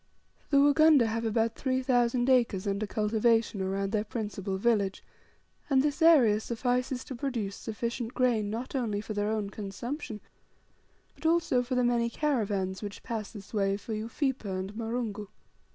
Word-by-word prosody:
The 280 - +3
Wagunda 290 -1 +6
have 225 +1 -2
about 225 +1 +1
three 260 0 -1
thousand 245 -1 +2
acres 240 -7 +2
under 200 +1 -1
cultivation 220 0 +1
around 195 +1 -1
their 210 -1 +1
principal 205 -3 -4
village, 205 -2 +1 0.7
and 265 -2 +4
this 295 +2 -1
area 265 -11 +6
suffices 250 +3 -1
to - - -7
produce 235 -6 -3
sufficient 235 +2 -4
grain 235 -5 +2
not 230 +4 -5
only 230 -7 -1
for 215 +1 -5
their 205 0 -1
own 215 -2 -2
consumption, 215 - -5 0.9
but 320 - -3
also 325 -6 +3
for 250 +1 -3
the 250 - +2
many 240 -1 +2
caravans 205 -9 -1
which 205 -1 -7
pass 220 -4 -4
by - - -8
this 200 +1 -13
way 195 -2 +1
for 220 +2 -6
Ufipa 230 +4 -2
and 190 +1 -4
Marungu. 225 -2 -3
225 Hz, 160 wpm, -29 LUFS, 205-250 Hz, 0.9 s, Wagunda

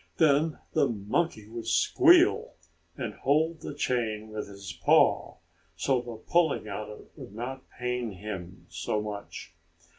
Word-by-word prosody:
Then 155 0 +3 0.2
the - - +3
monkey 110 +2 -1
would 115 +1 -7
squeal, - - +4 0.4
and 120 -5 -4
hold 155 +6 +1
the 145 - -6
chain 110 -6 -1
with 110 0 -5
his 100 -4 -8
paw, 85 - +3 0.4
so 130 +8 +1
the 120 -1 -7
pulling 160 +2 +1
on 105 +1 -5
it 105 - -12
would 100 - -11
not 130 +3 -6
pain 125 -1 -3
him 90 -3 -7
so 90 +5 -2
much. 105 -5 -7
110 Hz, 140 wpm, -28 LUFS, 100-135 Hz, 0.4 s, squeal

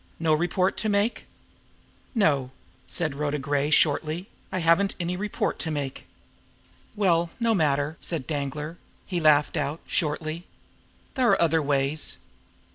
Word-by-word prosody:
No 160 -1 +3
report 175 +4 +1
to 220 - 0
make?" 205 +3 +1 0.9
"No," 145 - +2 0.4
said 160 -5 -1
Rhoda 145 +1 -1
Gray 145 +1 0
shortly. 155 +4 +2 0.2
"I - - -2
haven't 175 +3 +3
any 175 0 -1
report 205 +2 -2
to 165 - -1
make." 145 -3 -4 0.9
"Well, 175 -5 +2
no 230 -1 +3
matter!" 150 -3 +1
said 160 -7 -3
Danglar. 150 +2 -4 0.3
He 180 -2 -2
laughed 150 -2 +4
out 150 +4 -1
shortly. 155 +2 -2 0.7
"There 255 -3 +2
are - - +4
other 165 -1 +3
ways! 140 +1 0
160 Hz, 130 wpm, -26 LUFS, 145-180 Hz, 0.9 s, laughed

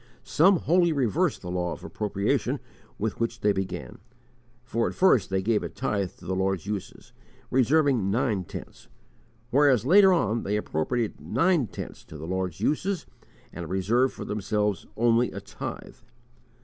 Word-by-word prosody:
Some 185 +4 +4
wholly 175 0 +3
reversed 130 -10 0
the 90 - -5
law 90 -1 -1
of - - -11
appropriation 100 0 -1 0.4
with 110 +1 -3
which 115 0 -2
they 105 0 +3
began; 95 -1 -5 0.6
for 115 -1 -1
at - - -5
first 180 - +4
they 95 0 0
gave 110 0 +2
a - - -4
tithe 100 -7 -2
to - - -15
the 95 - -2
Lord's 95 -2 -1
uses, 100 -2 -6 0.4
reserving 130 -4 +3
nine 105 -3 0
tenths, - - -10 0.6
whereas 135 -4 +4
later 190 +5 +7
on 115 - +1
they 105 +1 -1
appropriated 105 +5 -2
nine 170 -7 +2
tenths - - -8
to 80 - -10
the 75 - -7
Lord's 95 -1 -3
uses, 185 +5 0 0.5
and 85 -2 -6
reserved 115 +8 +1
for - - -6
themselves 105 -1 -1
only 120 +1 +3
a - - -5
tithe. - - -8
110 Hz, 155 wpm, -26 LUFS, 95-135 Hz, 0.6 s, later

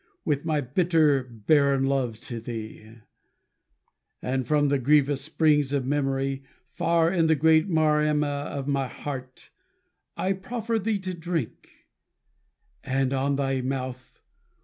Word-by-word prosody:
With 145 -3 +1
this 145 - -17
my 155 -2 +1
bitter, 150 0 +2
barren 135 +4 +2
love 130 -5 -1
to 120 -2 -6
thee; 110 -1 -8 1.2
And 130 -1 -2
from 145 -1 +2
the 140 -1 +2
grievous 145 +1 +3
springs 150 -2 +2
of 135 -3 0
memory. 135 -1 -1 0.3
Far 170 0 +2
in 170 -3 +2
the 160 - +4
great 160 +4 +3
Maremma 150 -3 +1
of 140 -1 -5
my 140 -2 0
heart, 130 -1 -8 0.7
I 190 - 0
proffer 225 +4 -3
thee 215 +1 0
to 185 -1 -4
drink; 165 -7 -5 1.0
and 135 0 0
on 135 +1 +1
thy 135 -1 0
mouth. 130 -1 -5
140 Hz, 130 wpm, -26 LUFS, 135-160 Hz, 1.2 s, the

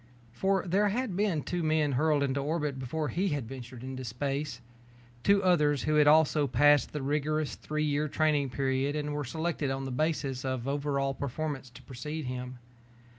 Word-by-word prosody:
For 190 +9 +1
there 200 +4 +3
had 230 -2 -2
been 190 -7 +1
two 175 -1 -2
men 155 -2 +2
hurled 145 +2 +2
into 140 0 0
orbit 150 -1 -1
before 145 +4 -2
he 185 +9 0
ventured 125 0 -8
into 130 0 -5
space. 135 +2 -3 0.6
Two 200 +8 +4
others 150 -6 +3
who 155 - +1
had 150 -1 +5
also 150 -1 +5
passed 145 +1 +4
the 150 -2 -4
rigorous 150 +2 0
three 155 0 -3
year 150 +1 +1
training 150 -2 +1
period 135 +2 0
and 150 -1 -2
were 145 0 -2
selected 160 +1 -2
on 135 0 -2
the 135 - -4
basis 140 -2 -1
of 130 -2 -2
over 140 0 -1
all 135 0 0
performance 140 0 -4
to 120 - -14
precede 150 +4 -6
him. 125 0 -5
145 Hz, 175 wpm, -30 LUFS, 135-155 Hz, 0.6 s, had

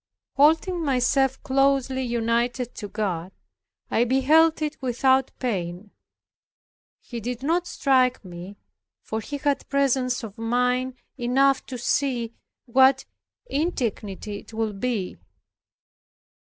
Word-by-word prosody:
Holding 325 +5 +3
myself 270 -1 +2
closely 270 -1 +2
united 240 0 -1
to 205 - -6
God, 190 -4 -3 0.6
I 230 - +3
beheld 300 +6 +4
it 300 0 -4
without 260 +1 +2
pain. 190 -4 -3 1.1
He 240 - -7
did 245 +3 -5
not 340 +4 +1
strike 255 - +2
me 180 +3 -9 0.5
for 220 - -3
he 290 +5 -5
had 285 -1 -1
presence 265 -3 +1
of 215 -1 -8
mind 250 +2 0 0.2
enough 270 +3 +3
to 255 - -5
see 240 -1 0 0.3
what 265 +2 +4 0.4
indignity 220 - -2
it - - -16
would 220 -3 -2
be. 225 -7 -2
250 Hz, 110 wpm, -24 LUFS, 225-275 Hz, 1.1 s, beheld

